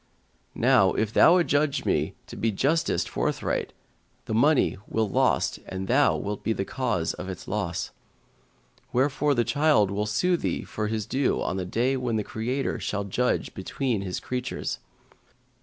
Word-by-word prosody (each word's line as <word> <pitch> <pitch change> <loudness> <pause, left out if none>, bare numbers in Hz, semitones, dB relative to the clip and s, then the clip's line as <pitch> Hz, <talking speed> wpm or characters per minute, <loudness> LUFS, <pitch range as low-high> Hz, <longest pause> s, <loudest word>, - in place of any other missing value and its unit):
Now, 120 -6 +4
if 110 0 -1
thou 175 - +7
adjudge 150 -4 +1
me - - 0
to - - -10
be 115 - 0
justiced 145 +11 +1
forthright, - - -2 0.5
the - - -4
money 140 +6 +3
will 110 -1 0
lost 95 - +1
and 95 0 -5
thou 140 +4 +3
shalt 105 0 -4
be 110 - +1
the 100 - -3
cause 105 -11 -1
of 90 - -7
its 95 - -7
loss; 95 -5 -2 1.0
wherefore 140 +3 +2
the 120 - +3
child 115 -4 +3
will 105 +2 -1
sue 175 +12 +2
thee - - -2
for 105 0 -3
his 110 -1 -2
due 135 +4 0
on 95 - -2
the 95 - -2
day 125 +8 0
when 125 -3 -1
the 105 - 0
Creator 125 +7 -2
shall 105 0 -2
judge 120 +6 -1
between 115 +3 -2
His 95 -2 -3
creatures. 125 - -4
115 Hz, 160 wpm, -26 LUFS, 100-135 Hz, 1.0 s, thou